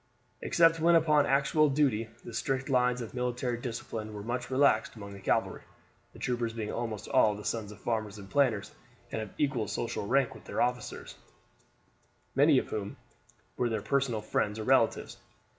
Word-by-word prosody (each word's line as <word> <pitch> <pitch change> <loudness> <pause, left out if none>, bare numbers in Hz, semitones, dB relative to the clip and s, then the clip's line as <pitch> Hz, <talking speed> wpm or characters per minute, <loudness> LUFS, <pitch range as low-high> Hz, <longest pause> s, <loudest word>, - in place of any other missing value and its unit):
Except 165 -1 +4
when 170 +1 +5
upon 155 -3 +4
actual 140 +3 +3
duty 130 -6 +1 0.2
the 120 - -8
strict 135 0 -2
lines 125 -1 +2
of 115 - -7
military 125 -1 -2
discipline 115 -3 -5
were 105 - -6
much 120 +3 -3
relaxed 130 -4 +3
among 100 -2 -9
the 100 - -10
cavalry, 95 - 0 0.5
the - - -13
troopers 120 -2 -2
being 110 -2 -4
almost 110 -3 -4
all 105 -1 +4
the 105 - -9
sons 110 -3 -2
of 105 - -12
farmers 110 -3 -2
and 100 -1 -10
planters 120 -4 +1 0.4
and 110 - -2
of 110 - -6
equal 135 -7 0
social 115 -3 -3
rank 135 +1 +2
with - - -14
their - - -4
officers, 125 0 -2 1.2
many 140 +1 +5
of - - 0
whom 100 -2 -4 0.6
were 125 - +1
their 110 -3 -2
personal 125 -2 0
friends 105 0 -1
or 110 - -4
relatives. - - +2
120 Hz, 175 wpm, -30 LUFS, 110-135 Hz, 1.2 s, when